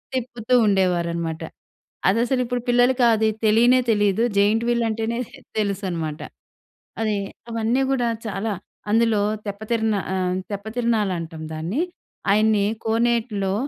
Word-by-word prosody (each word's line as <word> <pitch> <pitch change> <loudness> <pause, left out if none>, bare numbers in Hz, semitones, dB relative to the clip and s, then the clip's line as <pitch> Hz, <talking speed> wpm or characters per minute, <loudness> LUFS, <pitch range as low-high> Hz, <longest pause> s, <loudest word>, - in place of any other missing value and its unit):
తిప్పుతూ 245 -1 -3
ఉండేవారనమాట. 170 -4 0 0.7
అదసలు 240 +5 +2
ఇప్పుడు 245 0 -2
పిల్లలకి 245 +1 +4
అది 220 0 +2 0.2
తెలీనే 235 +4 +5
తెలీదు. 205 0 +2
జెయింట్ 210 +3 +3
వీల్ 240 -1 +2
అంటేనే 225 +1 -2 0.4
తెలుసనమాట. 185 -7 -2 0.8
అది 215 -2 +1 0.3
అవన్నీ 230 +3 0
గూడా 245 -3 +1 0.2
చాలా. 210 +1 -2 0.4
అందులో 225 -1 +3 0.2
తెప్పతిరన 220 +2 -1 0.2
ఆహ్, 185 -1 0
తెప్పతిరనాలంటాం 205 -6 -2
దాన్ని. 165 - -2 0.5
ఆయన్ని 215 0 +3 0.2
కోనేట్లో 225 -3 +1
220 Hz, 100 wpm, -23 LUFS, 195-235 Hz, 0.8 s, తెలీనే